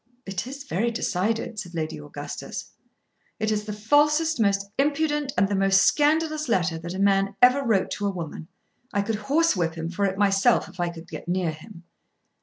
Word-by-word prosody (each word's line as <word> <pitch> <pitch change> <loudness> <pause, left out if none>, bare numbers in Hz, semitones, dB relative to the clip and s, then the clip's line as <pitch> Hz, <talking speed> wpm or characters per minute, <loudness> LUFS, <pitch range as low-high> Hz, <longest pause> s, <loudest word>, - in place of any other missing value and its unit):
"It 195 +3 -4
is 275 +1 -7
very 230 -3 -1
decided," 225 0 -1
said 175 -4 -7
Lady 155 - -3
Augustus. 75 - -7 0.7
"It 215 0 0
is 210 -1 -1
the 215 - -4
falsest, 295 +9 +2
the 225 - +3
most 200 0 0
impudent, 295 0 +1
and 195 - +4
the 200 - -2
most 195 0 +4
scandalous 310 0 +2
letter 175 -6 +1
that 170 +2 -6
a - - -4
man 195 0 +2
ever 255 +3 +5
wrote 215 -7 +1
to 205 - -2
a - - +1
woman. 165 -4 -6 0.4
I 200 - 0
could 215 +1 -2
horsewhip 235 - +2
him 165 +1 -4
for 200 +3 0
it 190 -1 -1
myself 200 +3 +3
if 185 0 -15
I 175 0 0
could 170 -1 -10
get - - -8
near 175 -2 0
him." 170 +3 -12
200 Hz, 195 wpm, -25 LUFS, 180-255 Hz, 0.7 s, ever